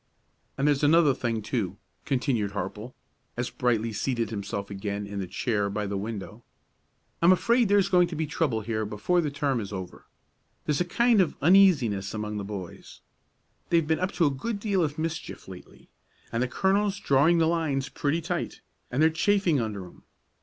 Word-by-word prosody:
"And 140 +2 +1
there's 145 -1 +2
another 155 -1 +5
thing, 115 -4 -2
too," 110 -4 -2 0.3
continued 125 -7 0
Harple, 105 +5 -5 0.4
as 120 0 -2
Brightly 115 -3 0
seated 115 0 -1
himself 100 -1 -4
again 100 +1 -4
in 100 0 -5
the 95 - -3
chair 100 +2 -1
by 105 +1 -2
the 100 0 -3
window. 105 +2 -6 0.8
"I'm 170 +2 +6
afraid 235 +4 +3
there's 200 -1 +4
going 180 -2 +4
to 170 - -6
be 160 +1 -1
trouble 145 -7 -1
here 110 0 -2
before 110 - 0
the 155 - -1
term 140 -2 -1
is 100 -2 -6
over. 95 -3 -7 0.6
There's 150 +2 0
a - - +1
kind 235 +3 +3
of 175 - -1
uneasiness 140 - +4
among 105 0 -3
the 100 - -3
boys; 100 -3 -8 0.7
they've 165 -2 +3
been 160 +1 +1
up 185 +1 -1
to 170 -1 +2
a 145 - +3
good 200 - -4
deal 200 -4 +1
of 150 -1 -2
mischief 160 0 -5
lately, 95 -1 -13 0.4
and 115 - -1
the 130 - +1
colonel's 195 +6 +1
drawing 145 +4 +3
the 165 - +3
lines 160 -5 0
pretty 150 +4 -1
tight, 170 +1 -4 0.3
and 135 +5 +1
they're 160 - +5
chafing 175 -4 +2
under 105 -4 -4
'em. 90 - -15
135 Hz, 180 wpm, -27 LUFS, 105-170 Hz, 0.8 s, I'm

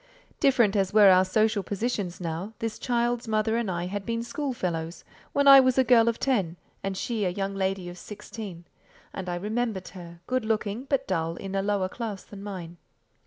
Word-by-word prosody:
Different 240 -8 +4
as 195 0 0
were 205 -3 +8
our 185 0 +6
social 215 +2 +2
positions 200 -2 -3
now, 175 +4 -4
this 225 -1 -4
child's 240 -1 0
mother 220 0 +1
and 230 -3 -1
I 175 -1 -2
had 200 +2 -4
been 230 +2 -2
schoolfellows, 185 - -3 0.3
when 280 0 +2
I 275 -1 +11
was 255 -1 +3
a 260 - +6
girl 235 -2 +5
of 230 - -3
ten 195 -11 0 0.2
and 195 -1 -3
she 225 -1 -2
a 185 - +2
young 195 +2 -3
lady 190 -1 -1
of 175 0 -8
sixteen; 200 -4 -9 0.5
and 190 -2 -5
I 175 - -1
remembered 210 +1 -2
her, 170 -2 -11
good 255 -1 0
looking, 220 +2 -1
but 270 -1 0
dull, 165 -3 -1
in 195 +2 -7
a 195 - +1
lower 200 -1 0
class 210 -1 -5
than 200 -1 -11
mine. 180 -4 -7
205 Hz, 195 wpm, -27 LUFS, 185-235 Hz, 0.5 s, I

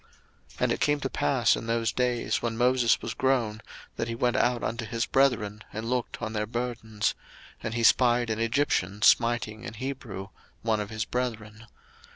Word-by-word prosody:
02:002:011 - - -15
And - - +2
it - - 0
came 145 0 +2
to 135 - -2
pass 130 -5 +2
in 115 - -6
those 115 0 +1
days, 125 -2 0
when 115 -1 -2
Moses 125 -1 +3
was - - -3
grown, 125 -6 0 0.4
that 115 - -1
he 115 - -3
went 120 +1 +1
out 120 -1 +2
unto 115 +1 -2
his 115 +1 -2
brethren, 110 -6 +1
and 110 +3 -4
looked 125 -2 -2
on 110 -1 -3
their 105 -1 -1
burdens: 115 -2 -2 0.5
and 115 - -4
he 120 - 0
spied 120 -1 +4
an 110 - -2
Egyptian 115 -5 0
smiting 115 -2 +3
an 115 - -7
Hebrew, 115 -6 -6 0.3
one 110 -2 +1
of 105 -1 -4
his 110 0 -3
brethren. 115 -3 -4
115 Hz, 185 wpm, -27 LUFS, 110-125 Hz, 0.5 s, spied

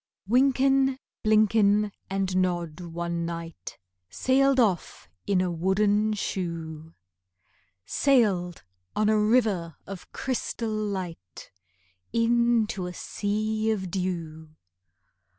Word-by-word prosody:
Wynken, 270 +2 +3 0.3
Blynken, 210 -1 +3 0.2
and 190 -1 -1
Nod 175 -3 0
one 170 0 -4
night 165 - -6 0.3
Sailed 270 - +2
off 185 - 0 0.2
in 195 -2 +2
a 180 -1 0
wooden 205 +5 +2
shoe,— 165 -5 -4 0.9
Sailed 200 - +2 0.3
on 215 0 +2
a 215 0 +3
river 210 - +2
of 195 -2 -9
crystal 235 -3 -3
light 185 - -5 0.6
Into 230 -4 +2
a 180 - -6
sea 215 +3 -2
of 190 -5 -2
dew. 165 -4 -4
200 Hz, 95 wpm, -26 LUFS, 170-220 Hz, 0.9 s, Wynken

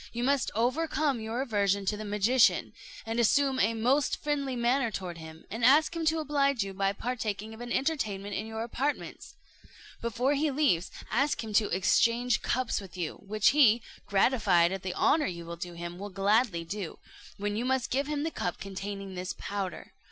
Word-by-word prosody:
You 240 +1 -3
must 275 0 +2
overcome 280 +3 +1
your 225 +4 -2
aversion 200 -5 +1
to 210 - 0
the 215 - -6
magician, 210 +4 +3 0.3
and 225 +1 -2
assume 265 +3 +3
a 230 0 +2
most 255 +6 +2
friendly 280 -3 -1
manner 240 +1 +1
toward 180 -5 -5
him, 160 0 -11
and 225 +3 -4
ask 300 +7 +5
him 330 -1 -2
to 320 +1 +3
oblige 280 -5 +1
you 195 -1 -6
by 195 0 +1
partaking 220 -1 -4
of 220 - -11
an 240 0 -6
entertainment 215 -10 -1
in 215 +3 -3
your 220 0 -4
apartments. 265 +5 -4 0.7
Before 240 +4 0
he 295 +2 +1
leaves, 270 - +1 0.2
ask 275 +3 +1
him 220 -1 -6
to 210 0 +3
exchange 230 +6 +2
cups 255 -3 -1
with 190 -2 -11
you, 170 -3 -3
which 215 0 +3
he, 240 -6 +5 0.2
gratified 195 -5 +3
at 195 -1 -3
the 185 -1 -4
honour 305 0 +3
you 170 -2 -6
do 175 -1 -5
him, 175 +1 -7
will 205 +1 -6
gladly 200 -1 +1
do, 190 0 -5 0.4
when 205 +1 -2
you 225 - -1
must 260 -1 0
give 275 +2 0
him 295 -1 -2
the 325 - -2
cup 175 - -3
containing 195 0 -6
this 180 0 -4
powder. 200 -2 -5
225 Hz, 185 wpm, -29 LUFS, 195-265 Hz, 0.7 s, ask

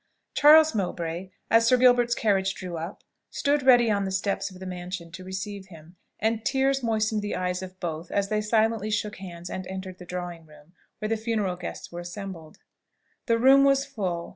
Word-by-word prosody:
Charles 310 +2 +7
Mowbray, 180 -3 -3 0.2
as 230 0 +5
Sir 255 - +5
Gilbert's 245 -1 +4
carriage 195 -3 +1
drew 180 -2 -6
up, 165 +3 -6 0.3
stood 290 0 +1
ready 245 -3 +5
on 200 -1 +1
the 190 - -2
steps 190 +2 -1
of 185 -1 -13
the 190 - -8
mansion 180 -1 -6
to 185 +2 -9
receive 190 +1 -6
him; 165 -1 -15 0.2
and 220 +1 0
tears 270 +1 +1
moistened 220 -2 0
the 205 - -3
eyes 180 0 -2
of 185 0 -9
both 165 -1 -5
as 200 0 0
they 215 0 +1
silently 220 0 +1
shook 210 -1 -2
hands 175 -2 -8
and 185 +1 -5
entered 190 -1 -7
the 180 - -10
drawing 175 -2 -6
room, 150 +2 -19 0.2
where 215 - -4
the 225 - +1
funeral 215 -4 -1
guests 180 0 -7
were 175 - -6
assembled. 175 -2 -8 0.7
The 230 -1 +3
room 270 +3 +6
was 275 0 +3
full. 185 -11 -4
195 Hz, 190 wpm, -26 LUFS, 180-225 Hz, 0.7 s, Charles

